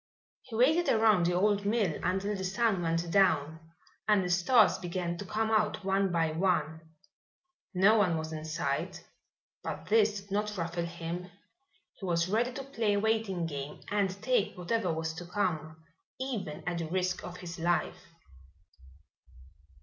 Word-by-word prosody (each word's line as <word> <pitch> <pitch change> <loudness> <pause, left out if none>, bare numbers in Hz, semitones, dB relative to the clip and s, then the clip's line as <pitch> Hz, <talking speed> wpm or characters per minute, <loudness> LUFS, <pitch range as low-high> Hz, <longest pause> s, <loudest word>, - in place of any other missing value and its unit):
He 235 - -9
waited 310 +9 +4
around 215 -6 +4
the 175 - +1
old 205 +2 +2
mill 205 -6 +1
until 190 +3 0
the 190 - -4
sun 195 0 +1
went 165 0 -1
down 160 -5 +3 0.5
and 210 -3 +4
the 180 - -2
stars 200 +5 +4
began 175 -1 -3
to 205 - -5
come 220 +3 -1
out 215 -2 +1
one 195 0 +1
by 165 -2 +1
one. 160 -2 0 0.9
No 200 +5 +5
one 180 -5 +2
was 160 0 -4
in 155 -1 -5
sight, 145 -3 -3 0.6
but 175 - -6
this 210 -1 +3
did 200 0 -19
not 210 +1 -1
ruffle 170 0 -2
him. 170 +1 -5 0.7
He 195 - -6
was 170 0 +1
ready 230 +6 +1
to 270 +2 -6
play 230 -6 0
a 205 - +2
waiting 220 -5 0
game 145 -2 -6
and 205 -2 +2
take 250 -8 +1
whatever 180 +1 0
was 160 0 -2
to 175 +2 -8
come, 160 -5 -2 0.4
even 230 - -4
at 175 -1 -1
the 165 - -3
risk 185 +1 -1
of 180 0 -7
his 175 -1 -8
life. 170 -1 -1
185 Hz, 160 wpm, -30 LUFS, 170-210 Hz, 0.9 s, No